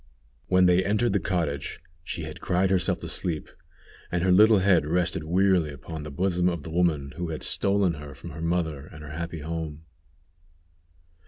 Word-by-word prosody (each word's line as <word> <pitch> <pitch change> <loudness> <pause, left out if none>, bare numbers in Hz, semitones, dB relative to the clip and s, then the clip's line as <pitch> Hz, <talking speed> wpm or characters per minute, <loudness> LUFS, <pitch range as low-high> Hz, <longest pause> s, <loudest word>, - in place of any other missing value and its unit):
When 95 0 +4
they 90 +1 +4
entered 105 +3 +1
the 100 - +3
cottage 85 -8 -2 0.2
she - - -5
had - - -8
cried 95 +1 +1
herself 90 -4 +2
to - - -5
sleep, 80 -4 -3 0.6
and 85 0 0
her 95 - +3
little 105 +4 +7
head 95 -3 +4
rested 85 +1 0
wearily 90 -1 +3
upon 75 +3 -7
the 75 - -7
bosom 90 +3 +1
of 85 -4 -4
the 80 - -7
woman 80 -6 +1
who 85 -1 -3
had 80 - -4
stolen 100 -3 +2
her 75 -2 -9
from 85 +5 -9
her 80 +2 -8
mother 80 -4 -1
and 75 - -11
her 75 - -8
happy 85 0 -5
home. 80 -1 -5
85 Hz, 180 wpm, -26 LUFS, 75-95 Hz, 0.6 s, little